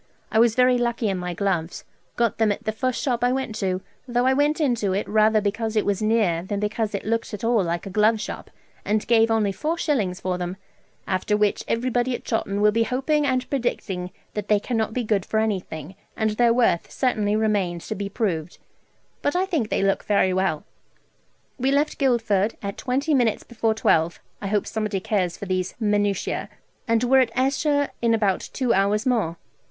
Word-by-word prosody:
I 220 Hz, -, +3 dB
was 230 Hz, -1 st, +4 dB
very 250 Hz, 0 st, +4 dB
lucky 235 Hz, -2 st, 0 dB
in 190 Hz, -2 st, -1 dB
my 180 Hz, -1 st, -4 dB
gloves 175 Hz, -3 st, -2 dB, 0.3 s
got 235 Hz, -2 st, 0 dB
them 220 Hz, -2 st, +3 dB
at 205 Hz, -, -4 dB
the 215 Hz, -, -1 dB
first 255 Hz, +3 st, -2 dB
shop 245 Hz, -4 st, 0 dB
I 245 Hz, -, +3 dB
went 260 Hz, -3 st, -2 dB
to, 185 Hz, -2 st, -1 dB, 0.3 s
though 245 Hz, 0 st, +1 dB
I 260 Hz, -, +4 dB
went 290 Hz, +3 st, +2 dB
into 235 Hz, -10 st, +1 dB
it 200 Hz, -, -1 dB
rather 215 Hz, 0 st, +4 dB
because 220 Hz, +2 st, -2 dB
it 215 Hz, -, +2 dB
was 205 Hz, -1 st, 0 dB
near 215 Hz, -6 st, +2 dB
than 200 Hz, +3 st, -3 dB
because 210 Hz, 0 st, -1 dB
it 200 Hz, -, -5 dB
looked 230 Hz, 0 st, -1 dB
at 205 Hz, -, -11 dB
all 230 Hz, -3 st, +3 dB
like 170 Hz, 0 st, -2 dB
a 195 Hz, -, -6 dB
glove 215 Hz, +2 st, +3 dB
shop, -, -, -6 dB, 0.3 s
and 210 Hz, +1 st, 0 dB
gave 225 Hz, -1 st, +4 dB
only 220 Hz, -3 st, +2 dB
four 310 Hz, -, -2 dB
shillings 210 Hz, -, 0 dB
for 180 Hz, -1 st, -2 dB
them; 180 Hz, +1 st, -4 dB, 0.5 s
after 190 Hz, +2 st, 0 dB
which 210 Hz, -1 st, +1 dB
everybody 245 Hz, +1 st, 0 dB
at -, -, -8 dB
Chawton 205 Hz, -3 st, -1 dB
will 210 Hz, 0 st, +5 dB
be 230 Hz, +2 st, +1 dB
hoping 275 Hz, +5 st, +1 dB
and 255 Hz, -1 st, 0 dB
predicting 195 Hz, -9 st, -2 dB, 0.2 s
that 210 Hz, -1 st, -4 dB
they 210 Hz, -1 st, +4 dB
cannot 225 Hz, 0 st, -1 dB
be 245 Hz, +2 st, -2 dB
good 210 Hz, -4 st, +1 dB
for 220 Hz, -, -2 dB
anything, 185 Hz, -6 st, -3 dB, 0.2 s
and 220 Hz, -1 st, +1 dB
their 235 Hz, +2 st, +3 dB
worth 230 Hz, -8 st, +2 dB
certainly 215 Hz, -5 st, 0 dB
remains 200 Hz, -6 st, 0 dB
to -, -, -2 dB
be 200 Hz, +1 st, -4 dB
proved; 180 Hz, -7 st, -2 dB, 0.6 s
but 290 Hz, -, 0 dB
I 370 Hz, +1 st, +2 dB
think 315 Hz, -, -1 dB
they -, -, 0 dB
look 195 Hz, 0 st, +1 dB
very 200 Hz, -3 st, +2 dB
well. 185 Hz, -5 st, 0 dB, 1.0 s
We 260 Hz, +2 st, +1 dB
left 285 Hz, +2 st, +1 dB
Guildford 225 Hz, -6 st, +1 dB
at 200 Hz, 0 st, -3 dB
twenty 280 Hz, +4 st, -1 dB
minutes 240 Hz, -6 st, +2 dB
before 225 Hz, -2 st, -1 dB
twelve 165 Hz, -5 st, +2 dB, 0.2 s
(I 200 Hz, -, -3 dB
hope 205 Hz, +1 st, 0 dB
somebody 215 Hz, -3 st, -2 dB
cares 185 Hz, -3 st, -1 dB
for -, -, -6 dB
these 185 Hz, -1 st, -2 dB
minutiae), 205 Hz, -3 st, 0 dB, 0.4 s
and 230 Hz, +1 st, +2 dB
were 265 Hz, +2 st, +5 dB
at 255 Hz, -3 st, +3 dB
Esher 285 Hz, +2 st, +1 dB
in 230 Hz, -1 st, +3 dB
about 205 Hz, -4 st, 0 dB
two 250 Hz, -3 st, +1 dB
hours 200 Hz, +2 st, +2 dB
more. 215 Hz, -10 st, 0 dB
220 Hz, 200 wpm, -24 LUFS, 195-245 Hz, 1.0 s, will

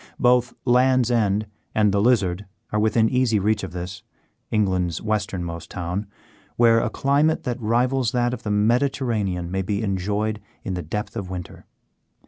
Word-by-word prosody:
Both 125 Hz, -1 st, +3 dB
Land's 125 Hz, 0 st, +4 dB
End 105 Hz, -3 st, +2 dB, 0.3 s
and 105 Hz, -1 st, +4 dB
the 100 Hz, 0 st, +2 dB
Lizard 100 Hz, -5 st, +2 dB, 0.3 s
are 105 Hz, -, +1 dB
within 110 Hz, +1 st, +3 dB
easy 125 Hz, -3 st, +2 dB
reach 105 Hz, +1 st, +1 dB
of 95 Hz, -, -5 dB
this, 90 Hz, +1 st, -6 dB, 0.5 s
England's 95 Hz, -6 st, 0 dB
westernmost 90 Hz, -6 st, -3 dB
town, 90 Hz, +3 st, -4 dB, 0.5 s
where 115 Hz, -1 st, +5 dB
a -, -, 0 dB
climate 145 Hz, +3 st, +1 dB
that 125 Hz, 0 st, -3 dB
rivals 120 Hz, +2 st, +1 dB
that 120 Hz, 0 st, +1 dB
of 125 Hz, -, -5 dB
the 110 Hz, -, -4 dB
Mediterranean 105 Hz, -5 st, 0 dB
may 95 Hz, +1 st, 0 dB
be 100 Hz, +3 st, -2 dB
enjoyed 105 Hz, +2 st, -1 dB, 0.2 s
in 95 Hz, -, -3 dB
the 90 Hz, -, -3 dB
depth 105 Hz, +8 st, -5 dB
of 100 Hz, -5 st, -4 dB
winter. 90 Hz, -2 st, -8 dB
105 Hz, 155 wpm, -23 LUFS, 95-120 Hz, 0.5 s, where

